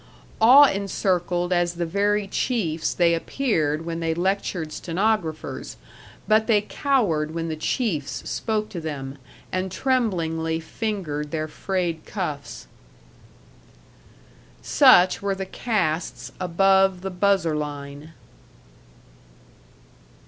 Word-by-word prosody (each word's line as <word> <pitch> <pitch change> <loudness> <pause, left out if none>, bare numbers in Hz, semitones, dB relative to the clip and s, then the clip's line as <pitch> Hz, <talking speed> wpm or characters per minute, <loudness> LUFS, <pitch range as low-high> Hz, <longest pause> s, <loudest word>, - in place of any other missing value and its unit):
Awe 260 +6 +9
encircled 180 -2 -1
as 175 -1 +1
the 170 0 -2
very 200 +3 0
chiefs 175 -8 -1
they 170 -1 +3
appeared 165 - -1
when 165 0 -4
they 165 -1 -1
lectured 180 -3 -1
stenographers, 175 -3 -2 0.5
but 220 0 +3
they 220 -3 +4
cowered 200 - 0
when 165 0 -2
the 160 - -2
chiefs 155 - -2
spoke 215 -1 -2
to 175 -5 -6
them, 140 -3 -6 0.3
and 185 0 -2
tremblingly 165 -11 0
fingered 160 -4 -4
their 155 0 -3
frayed 170 0 -3
cuffs. 150 -8 -5 2.0
Such 180 +1 +5
were 200 -1 -1
the 190 0 -4
castes 185 -6 -2
above 190 +1 +3
the 190 0 -4
buzzer 180 -3 +1
line. 145 +1 -6
175 Hz, 105 wpm, -24 LUFS, 160-200 Hz, 2.0 s, Awe